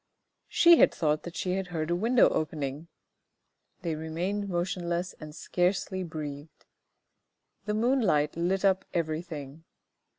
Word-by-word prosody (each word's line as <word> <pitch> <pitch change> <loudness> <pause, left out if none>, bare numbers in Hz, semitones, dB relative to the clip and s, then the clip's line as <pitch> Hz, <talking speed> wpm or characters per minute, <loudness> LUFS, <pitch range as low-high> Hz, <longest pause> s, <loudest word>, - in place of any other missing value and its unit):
She 340 0 +6
had - - +6
thought 150 -1 0
that 175 - -9
she 180 - -2
had 190 0 -1
heard 165 -2 -3
a - - +2
window 230 +6 +4
opening. 150 0 -3 1.0
They 165 -2 -1
remained 175 +6 -3
motionless 175 0 -2
and 155 -1 -9
scarcely 185 +2 -1
breathed. 150 -3 -7 1.0
The 210 0 -1
moonlight 215 - +2
lit 185 +4 0
up 190 -1 +3
everything. 155 -3 -4
175 Hz, 125 wpm, -28 LUFS, 155-190 Hz, 1.0 s, She